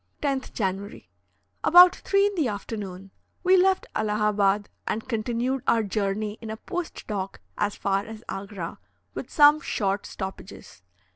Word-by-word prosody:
10th 275 Hz, -2 st, -1 dB
January. 195 Hz, -1 st, -4 dB, 0.5 s
About 355 Hz, +1 st, +8 dB
3 395 Hz, 0 st, +2 dB
in 410 Hz, -, 0 dB
the 320 Hz, -8 st, +1 dB
afternoon, 200 Hz, -3 st, -6 dB, 0.3 s
we 370 Hz, +1 st, +5 dB
left 380 Hz, +1 st, +3 dB
Allahabad 210 Hz, -1 st, +1 dB, 0.2 s
and 220 Hz, -, -2 dB
continued 240 Hz, +3 st, -1 dB
our 225 Hz, -1 st, +3 dB
journey 205 Hz, +1 st, -2 dB
in 225 Hz, -, -7 dB
a 220 Hz, -, -5 dB
post 355 Hz, -, -5 dB
dock 195 Hz, -3 st, -4 dB, 0.2 s
as 205 Hz, 0 st, -1 dB
far 195 Hz, 0 st, 0 dB
as 220 Hz, 0 st, -9 dB
Agra, 195 Hz, -3 st, -6 dB, 0.3 s
with -, -, -6 dB
some 295 Hz, -1 st, +6 dB
short 200 Hz, -9 st, -1 dB
stoppages. 190 Hz, -, -8 dB
215 Hz, 140 wpm, -26 LUFS, 200-270 Hz, 0.5 s, About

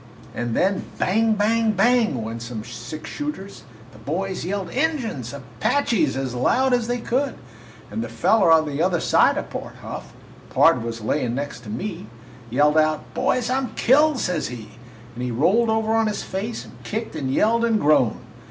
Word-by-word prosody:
And 120 Hz, -1 st, -3 dB
then 195 Hz, +1 st, +1 dB
bang! 220 Hz, +4 st, +2 dB
bang! 220 Hz, +1 st, +2 dB
bang! 220 Hz, -, +2 dB
went 115 Hz, +1 st, -5 dB
some 115 Hz, -2 st, -6 dB
six 140 Hz, +6 st, -8 dB
shooters, 295 Hz, -10 st, -6 dB, 0.3 s
the -, -, -15 dB
boys 185 Hz, +5 st, -3 dB
yelled 190 Hz, 0 st, -3 dB
'Injuns!' 250 Hz, -, -1 dB
'Apaches!' 140 Hz, -, 0 dB
as 135 Hz, -2 st, -3 dB
loud 250 Hz, -, +2 dB
as 240 Hz, -2 st, +1 dB
they 245 Hz, 0 st, 0 dB
could, 260 Hz, +3 st, -1 dB, 0.6 s
and 110 Hz, +2 st, -2 dB
the 115 Hz, -, -6 dB
feller 175 Hz, -, +3 dB
on 160 Hz, -1 st, +6 dB
the 145 Hz, +1 st, -2 dB
other 175 Hz, -1 st, +2 dB
side -, -, +3 dB
of -, -, -4 dB
Pard -, -, -6 dB
Huff -, -, -7 dB, 0.4 s
(Pard -, -, +4 dB
was 115 Hz, -1 st, -5 dB
layin' 120 Hz, +1 st, -1 dB
next 140 Hz, -2 st, -4 dB
to -, -, -8 dB
me) 170 Hz, -, -5 dB, 0.4 s
yelled 150 Hz, +5 st, +3 dB
out. 155 Hz, 0 st, 0 dB
'Boys, 250 Hz, -1 st, 0 dB
I 260 Hz, -, +2 dB
'm 265 Hz, -, -4 dB
killed!' 295 Hz, +3 st, +4 dB
says 180 Hz, -8 st, -1 dB
he, 115 Hz, -3 st, -8 dB, 0.4 s
and 125 Hz, +1 st, -6 dB
he 125 Hz, -, -1 dB
rolled 185 Hz, -, +2 dB
over 220 Hz, 0 st, +1 dB
on 225 Hz, 0 st, +3 dB
his 210 Hz, -, -2 dB
face 210 Hz, +5 st, -4 dB
and -, -, -15 dB
kicked 220 Hz, -4 st, -4 dB
and 135 Hz, -4 st, -2 dB
yelled 230 Hz, +10 st, +2 dB
and 225 Hz, -2 st, +2 dB
groaned. 145 Hz, -, +3 dB
180 Hz, 180 wpm, -23 LUFS, -, 0.6 s, on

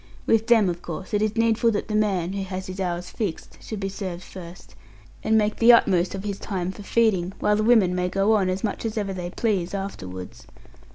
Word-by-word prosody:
With 225 Hz, 0 st, +2 dB
them, 225 Hz, -5 st, +5 dB
of 175 Hz, -1 st, -3 dB
course, 185 Hz, +5 st, -7 dB
it 210 Hz, -, +2 dB
is 215 Hz, 0 st, 0 dB
needful 230 Hz, 0 st, +3 dB
that 205 Hz, -, -2 dB
the 215 Hz, -, -4 dB
man 195 Hz, -4 st, +1 dB
(who 195 Hz, -1 st, -2 dB
has 190 Hz, 0 st, -5 dB
his 185 Hz, +1 st, -7 dB
hours 180 Hz, -1 st, -3 dB
fixed) 200 Hz, -8 st, -5 dB
should 220 Hz, -, -6 dB
be 195 Hz, -, -2 dB
served 185 Hz, -2 st, -5 dB
first, 180 Hz, -2 st, -11 dB, 0.5 s
and 220 Hz, 0 st, +3 dB
make 210 Hz, 0 st, +1 dB
the 235 Hz, +1 st, +7 dB
utmost 190 Hz, -5 st, +3 dB
of 195 Hz, -, -5 dB
his 200 Hz, -1 st, -4 dB
time 185 Hz, -2 st, -3 dB
for 205 Hz, -, -11 dB
feeding, 200 Hz, -4 st, +1 dB
while 210 Hz, 0 st, +2 dB
the 215 Hz, -, 0 dB
women 215 Hz, -6 st, +4 dB
may 180 Hz, 0 st, 0 dB
go 195 Hz, +4 st, +2 dB
on, 195 Hz, -4 st, +2 dB
as 185 Hz, +1 st, -2 dB
much 215 Hz, -, -2 dB
as 225 Hz, -1 st, -3 dB
ever 200 Hz, -2 st, -1 dB
they 180 Hz, -1 st, -5 dB
please, 195 Hz, -2 st, -1 dB
afterwards. 95 Hz, -, -7 dB
195 Hz, 225 wpm, -24 LUFS, 180-215 Hz, 0.5 s, the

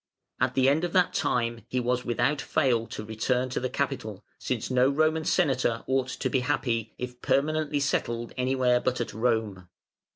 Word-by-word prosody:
At -, -, +1 dB
the 130 Hz, 0 st, +4 dB
end 145 Hz, +5 st, +3 dB
of 175 Hz, -, -2 dB
that 180 Hz, -2 st, +3 dB
time 115 Hz, -2 st, 0 dB
he 125 Hz, -, -1 dB
was 125 Hz, +1 st, 0 dB
without 125 Hz, +4 st, 0 dB
fail 120 Hz, -6 st, +1 dB
to 105 Hz, -, -7 dB
return 125 Hz, +4 st, -1 dB
to 125 Hz, -, -2 dB
the 130 Hz, -, -2 dB
capital, -, -, -3 dB
since -, -, -3 dB
no 130 Hz, +1 st, +4 dB
Roman 155 Hz, +2 st, +1 dB
Senator 130 Hz, -10 st, +1 dB
ought 130 Hz, -1 st, +1 dB
to 130 Hz, -, -3 dB
be 130 Hz, -, +1 dB
happy 120 Hz, -4 st, -1 dB
if 125 Hz, 0 st, -7 dB
permanently 150 Hz, +1 st, +1 dB
settled 120 Hz, -4 st, -1 dB
anywhere 125 Hz, -1 st, +2 dB
but 125 Hz, 0 st, -1 dB
at 120 Hz, -, -3 dB
Rome. 110 Hz, -6 st, -1 dB
125 Hz, 175 wpm, -27 LUFS, 120-140 Hz, -, the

